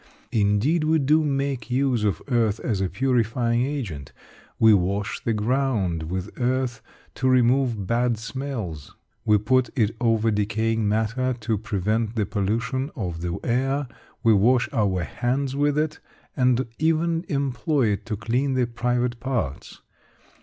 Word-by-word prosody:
Indeed, 110 +10 +2
we 160 +1 +3
do 155 +2 +3
make 135 -4 -2
use 125 -3 +1
of 100 -6 0
earth 115 -5 +1
as 105 -5 -1
a 95 - 0
purifying 120 -1 +1
agent. 110 - -4 0.4
We 110 -1 +6
wash 100 +2 0
the 115 - 0
ground 105 - 0
with 95 +2 -4
earth 125 -2 0 0.3
to 130 - 0
remove 125 -4 +2
bad 120 +2 +1
smells, 110 - -6 0.3
we 105 -1 +5
put 130 +3 +2
it 110 -1 +1
over 115 -1 +2
decaying 110 +1 0
matter 115 +4 0
to 110 0 0
prevent 110 +2 -1
the 105 -3 +1
pollution 115 +7 -1
of 90 - -4
the 85 +1 -2
air, 135 +3 0 0.4
we 115 -2 +5
wash 115 +5 +3
our 100 -7 +1
hands 130 - -2
with 145 +1 +1
it, 155 0 -1 0.4
and 130 -1 +2
even 165 +1 +1
employ 140 -2 0
it 100 - -2
to 110 -3 -2
clean 125 +6 0
the 125 -1 +2
private 120 0 -1
parts. 120 - -4
120 Hz, 145 wpm, -24 LUFS, 105-130 Hz, 0.4 s, We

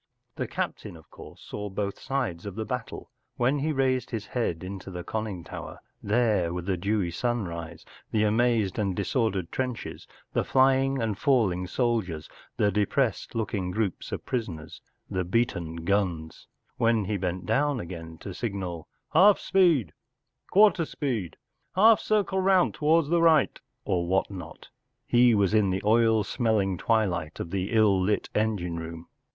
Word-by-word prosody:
The - - -3
captain, 85 - -4
of 80 - -19
course, - - -13
saw 105 0 -6
both 100 0 -3
sides 100 -10 -3
of 100 - -6
the 110 0 -3
battle. 125 -2 -5 0.3
When 130 +4 +2
he 155 +3 0
raised 130 -3 +1
his 110 -3 -4
head 105 -8 -2
into 95 0 -7
his 90 -1 -6
con¬ 110 0 -2
ning 95 -6 -6
tower - - -8 0.2
there 105 -6 +1
were 90 0 -4
the 95 +1 0
dewy 100 0 -1
sunrise, 85 -7 -3 0.2
the 110 -1 +1
amazed 110 -2 +2
and 100 -3 0
disordered 100 -9 -1
trenches, 125 -3 -4 0.3
the - - +1
flying 135 0 +3
and 110 -4 -2
falling 95 -10 +2
soldiers, 105 -9 -1 0.3
the 105 - +3
depressed 110 +6 0
looking 105 -5 -2
groups 95 -1 -2
of - - -5
prisoners, 80 -11 -4 0.3
the 95 -1 -2
beaten 85 -5 -1
guns; 85 -2 -2 0.3
when 115 -3 +2
he 105 +2 -1
bent 90 -1 -3
down 140 +4 +1
again 85 -3 -8
to 100 - -6
signal 95 -7 -4
“ - - -37
Half 195 +5 +7
speed,” 165 - +2 0.3
“ - - -46
Quarter 200 -4 +5
speed,” 120 - -3 0.2
“ - - -44
Half 220 +3 +6
circle 200 -3 +1
round 190 -1 +3
towards 155 0 +2
the 170 0 +3
right,” 160 -4 +4 0.3
or 85 -2 0
what 95 +2 +1
not, 90 -4 -9 0.4
he 120 -1 +5
was 100 -1 +2
in 105 -3 +4
the 95 +1 -2
oil 110 0 +4
smelling 105 -4 0
twilight 90 -9 0
of 85 - -5
the 95 0 -2
ill 105 -4 +4
lit 105 +3 0
engine 100 -6 -1
room. 80 0 -7
105 Hz, 165 wpm, -27 LUFS, 90-125 Hz, 0.4 s, Half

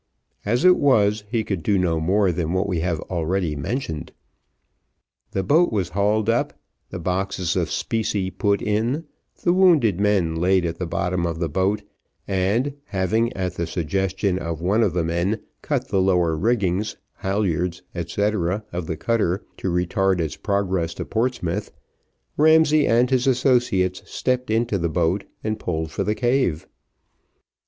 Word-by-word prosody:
As 120 - +1
it 180 0 +7
was, 105 -6 +3
he 115 -1 0
could 95 -5 -3
do 100 +4 +1
no 85 -3 +1
more 95 +4 +2
than 85 -1 -2
what 95 +2 0
we 90 -4 -1
have 85 -1 -1
already 85 -1 -1
mentioned. 80 - -4 1.2
The 95 - -2
boat 165 - +3
was 100 -6 -1
hauled 105 +3 +1
up, 115 +1 0 0.3
the - - -6
boxes 90 0 -1
of - - 0
specie 105 -4 -1
put 100 +1 0
in, 115 +9 0 0.4
the 175 - +3
wounded 160 - +4
men 100 -5 +2
laid 90 +2 +2
at 85 - -3
the 90 - -2
bottom 90 +1 -1
of 85 -1 -3
the 85 -1 -2
boat, 95 +6 0 0.4
and 100 +9 0
having, 110 +5 0
at 90 -2 -3
the 85 -2 -3
suggestion 95 +3 -1
of 85 -3 -4
one 95 +7 +1
of 100 -7 +2
the 90 -2 0
men, 85 +6 0 0.2
cut 135 -3 -2
the 95 -2 +2
lower 90 -4 +2
riggings, 100 +1 0 0.2
halyards, 90 -3 -1
&c., 85 +3 -4 0.5
of 85 -2 -3
the 80 - -3
cutter 105 -2 0
to 95 - -2
retard 90 +2 +1
its 80 -3 -2
progress 95 -5 -1
to - - -5
Portsmouth, 110 -5 -2 0.7
Ramsay 155 -1 +5
and 120 +3 +3
his 130 0 +2
associates 120 -8 +2
stepped 125 -1 -1
into 110 -2 +1
the 85 0 0
boat, 90 +4 0 0.2
and 110 0 -2
pulled 80 -4 -3
for - - -2
the 105 - 0
cave. 120 - +1
95 Hz, 160 wpm, -23 LUFS, 85-110 Hz, 1.2 s, it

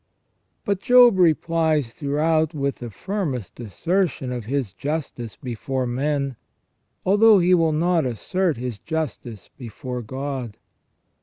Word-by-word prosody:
But 200 -2 0
Job 245 -5 +6
replies 160 -6 +2
throughout 155 +2 0
with 140 -1 -1
the 120 - -7
firmest 135 - -4
assertion 135 - -1
of 120 -3 -4
his 130 -5 -2
justice 135 -4 -4
before 130 +2 -3
men, 140 +1 -1 0.7
although 210 +3 +6
he 180 0 +3
will 165 -3 +4
not 165 -1 +1
assert 165 - -1
his 120 -3 -5
justice 145 - -5
before 125 +1 -6
God. 130 -1 -5
145 Hz, 120 wpm, -23 LUFS, 125-165 Hz, 0.7 s, Job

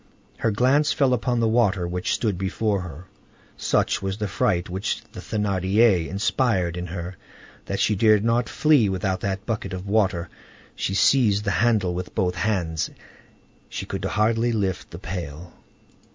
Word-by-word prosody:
Her 115 - +1
glance 130 +7 +3
fell 135 -3 +2
upon 120 0 0
the 115 - +3
water 105 -6 +2
which 90 +1 -1
stood 105 -5 -1
before 100 +2 -1
her; 90 -1 -9 0.5
such - - +1
was 95 0 -3
the 105 -1 -2
fright 90 0 0
which 95 +3 -3
the - - -9
Thénardier 100 -2 +2
inspired 100 -2 0
in 90 0 -4
her, 85 +1 -6 0.5
that - - -3
she 105 - +2
dared 105 0 +4
not 115 0 +1
flee 145 -9 +3
without 95 0 -1
that 100 +1 -3
bucket 105 -4 -3
of 95 +1 -5
water: 100 -5 +1 0.5
she 95 - -2
seized 105 -3 +4
the 105 - 0
handle 105 -4 +2
with 90 +1 -6
both 90 -1 +1
hands; 90 -6 -1 0.8
she - - -5
could - - -5
hardly 115 +3 +1
lift 100 -5 -2
the - - -9
pail. 85 -1 -6
100 Hz, 160 wpm, -24 LUFS, 90-110 Hz, 0.8 s, dared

